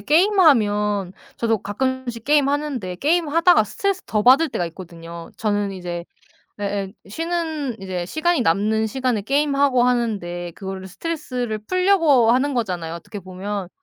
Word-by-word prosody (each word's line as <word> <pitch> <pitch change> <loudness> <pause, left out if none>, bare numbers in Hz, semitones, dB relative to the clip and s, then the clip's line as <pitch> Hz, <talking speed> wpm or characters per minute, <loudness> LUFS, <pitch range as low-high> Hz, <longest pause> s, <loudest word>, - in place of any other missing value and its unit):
게임하면 210 - +3 0.2
저도 225 -1 +1
가끔씩 240 +3 -3
게임하는데 285 -9 +1
게임하다가 330 - +3
스트레스 375 - -2
더 210 -1 0
받을 265 +8 +6
때가 175 - -2
있거든요. 170 -1 -10
저는 205 -2 0
이제 175 -2 -5 0.5
예예, 200 -1 -3 0.2
쉬는 320 - -3
이제 185 -2 -4
시간이 320 - +1
남는 215 +3 +2
시간에 250 -1 -1
게임하고 275 0 +2
하는데 205 -8 -1
그거를 190 -1 -6
스트레스를 250 - -4
풀려고 325 - +3
하는 270 +4 +2
거잖아요, 180 -9 -2
어떻게 185 +5 -8
보면. 190 +1 -5
225 Hz, 345 characters per minute, -22 LUFS, 195-290 Hz, 0.5 s, 받을